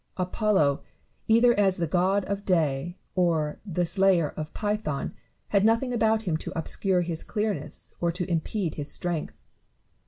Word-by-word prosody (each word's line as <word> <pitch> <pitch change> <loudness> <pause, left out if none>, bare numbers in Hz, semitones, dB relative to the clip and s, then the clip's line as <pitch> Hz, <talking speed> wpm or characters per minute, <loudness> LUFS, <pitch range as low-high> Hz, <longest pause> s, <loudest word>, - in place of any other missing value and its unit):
Apollo, 185 -6 +1 0.5
either 230 +2 +5
as 195 -2 +4
the 170 - 0
god 185 +4 +1
of 200 0 -3
day 165 -2 0 0.2
or 165 -5 +1
the 180 -3 -1
slayer 185 -4 +3
of 155 0 -6
Python, 210 -9 -2 0.4
had 200 -1 +3
nothing 230 +3 +2
about 220 -1 +2
him 170 -6 0
to - - -7
obscure 180 +3 +1
his 170 -2 -3
clearness 210 -2 -4
or 170 -1 +2
to 180 +1 -3
impede 170 0 -1
his 145 -1 -4
strength. 175 -3 -3
180 Hz, 150 wpm, -27 LUFS, 165-210 Hz, 0.5 s, either